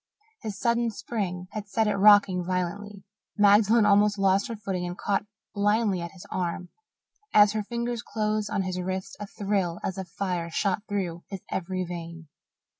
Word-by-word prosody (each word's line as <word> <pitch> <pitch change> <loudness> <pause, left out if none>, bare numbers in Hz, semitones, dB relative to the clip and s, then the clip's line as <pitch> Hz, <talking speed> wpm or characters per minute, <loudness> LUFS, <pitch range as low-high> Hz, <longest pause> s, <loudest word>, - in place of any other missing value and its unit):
His 210 -3 -5
sudden 235 +1 +1
spring 195 -5 -4
had 210 -1 -6
set 220 +2 +1
it 210 - +1
rocking 200 -2 +5
violently. 185 +3 -3 0.3
Magdalen 210 +2 +5
almost 205 0 +4
lost 195 0 +2
her 230 - -5
footing 195 -4 -3
and 175 +1 -6
caught 200 0 -1 0.3
blindly 205 -2 +1
at 170 0 -6
his 185 - -12
arm. 180 0 -3 0.7
As 210 -1 +7
her 215 0 -1
fingers 235 +2 -3
closed 215 -2 -1
on 195 - 0
his 185 -1 -3
wrist 190 +1 -4
a 205 - -6
thrill 195 -4 -1
as 190 0 -3
of 190 - -5
fire 180 -2 -3
shot 190 +3 0
through 180 -4 -3
his 195 -2 -6
every 185 0 -2
vein. 170 -2 -7
200 Hz, 170 wpm, -27 LUFS, 180-210 Hz, 0.7 s, As